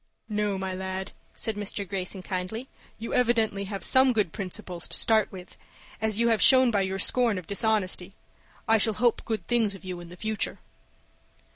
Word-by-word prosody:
"No, 210 -2 -1
my 190 0 -4
lad," 190 +1 -5 0.2
said 220 - -2
Mr. 205 -1 -3
Greyson, 185 0 -3
kindly. 185 +7 -4 0.3
"You 225 - -6
evidently 225 -5 +1
have 195 -1 -6
some 260 -1 +6
good 210 -7 0
principles 185 -3 -5
to - - -2
start 220 -2 +3
with, 185 -2 -11 0.5
as 220 -1 0
you 235 +1 +2
have 225 -2 +1
shown 260 -2 +7
by 200 -3 +1
your 190 0 -2
scorn 230 +1 +2
of 180 - -6
dishonesty. 200 -2 0 0.5
I 225 0 +4
shall 220 +1 +4
hope 240 -2 +1
good 220 -6 -3
things 225 -4 +1
of 190 - -14
you 180 -1 -5
in 175 -1 -11
the 180 - -12
future." 215 +2 -2
205 Hz, 180 wpm, -26 LUFS, 190-225 Hz, 0.5 s, shown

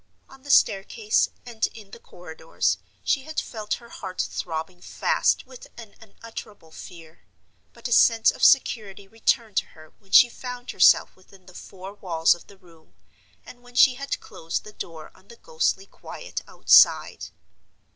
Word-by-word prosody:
On 270 - -17
the 285 - -14
staircase 210 -2 +2 0.2
and 230 -2 -2
in 210 -3 -13
the 235 - -12
corridors 160 -4 -4 0.2
she 275 - +1
had 315 +3 -4
felt 215 -2 -4
her 235 -1 -15
heart 185 -4 -9
throbbing 170 +2 -4
fast - - 0
with 255 -1 -13
an 225 -4 -12
unutterable 215 -5 -12
fear; 165 -1 -13 0.5
but - - -8
a - - -9
sense 225 -1 +5
of - - -10
security 205 -7 +2
returned 225 0 -1
to - - +2
her 155 0 -16
when 195 -2 -27
she 245 - +8
found 250 +1 -8
herself - - +4
within 185 0 -21
the 185 - -16
four 190 +2 -11
walls 165 -5 +1
of 175 - -14
the 200 - -17
room, 165 -4 -23 0.5
and 245 - -14
when 245 0 -19
she 260 +1 +6
had 275 +2 -5
closed 165 0 -6
the 210 - -13
door 160 -5 -9
on 190 - -24
the 235 - -14
ghostly 475 - -2
quiet - - -9
outside. - - +4
210 Hz, 165 wpm, -24 LUFS, 180-240 Hz, 0.5 s, she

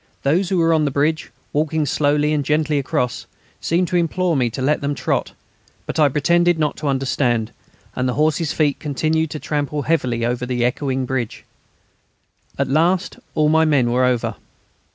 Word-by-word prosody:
Those 170 +7 +1
who 190 - +1
were 165 -1 +3
on 155 -1 +2
the - - +1
bridge, 150 +3 0 0.2
walking 155 +1 0
slowly 150 +1 +1
and 150 -2 0
gently 150 0 +1
across, 130 -3 -2 0.3
seemed 175 +2 0
to 180 - -2
implore 175 0 0
me 125 -3 +1
to 120 - -7
let 140 +4 +1
them 145 0 -1
trot; - - -2 0.5
but - - -4
I 150 -2 +5
pretended 170 +4 +2
not 150 -2 0
to 150 - -4
understand, 130 -4 0 0.4
and 130 0 0
the 125 - -2
horses' 155 +1 +1
feet 145 -3 0
continued 155 +2 0
to 155 - -5
trample 145 -1 -2
heavily 125 -8 0
over 125 +1 -2
the 120 -1 0
echoing 130 +1 -1
bridge. 125 -3 -4 1.1
At - - 0
last 170 +7 +1 0.2
all 155 -1 +3
my 160 +1 +4
men 140 -6 +2
were 125 +1 +2
over. 125 -2 0
150 Hz, 175 wpm, -20 LUFS, 130-160 Hz, 1.1 s, I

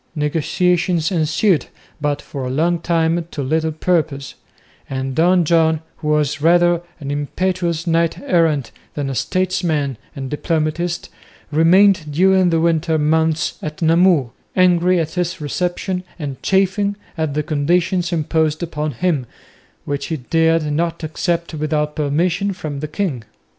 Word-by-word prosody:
Negotiations 165 +3 +1
ensued, 160 - +1 0.3
but 145 0 -1
for 140 -2 -6
a 125 - -3
long 165 +6 +1
time 165 0 0
to 145 - -4
little 160 +4 0
purpose; 155 -4 -1 0.6
and 135 0 -3
Don 175 +4 +3
John, 160 -1 +3 0.2
who 150 - -6
was 150 -1 +1
rather 175 +1 +4 0.2
an 140 -2 -5
impetuous 170 +3 -1
knight 165 -1 +1
errant 165 - +1 0.2
than 140 -2 -2
a - - -3
statesman 175 - -1 0.2
and 135 -1 -5
diplomatist, 165 +3 -1 0.4
remained 170 +1 +4
during 185 +3 +4
the 165 -1 +2
winter 160 -1 +1
months 160 +1 +1
at 155 +2 -5
Namur, 165 -6 +4 0.2
angry 180 0 +4
at 160 -1 -2
his 180 +1 -2
reception 180 +4 -2
and 145 -5 -6
chafing 195 +1 +1 0.2
at 160 -4 -2
the 150 - 0
conditions 170 +4 0
imposed 160 -1 0
upon 150 -3 -3
him, 140 -2 -1 0.6
which 145 0 -3
he 160 - -2
dared 165 +4 +2
not 170 +2 -1
accept 170 +2 -2
without 150 -1 -1
permission 170 +6 0
from 155 -6 -6
the 155 - -4
king. 155 - -3
160 Hz, 135 wpm, -19 LUFS, 150-175 Hz, 0.6 s, rather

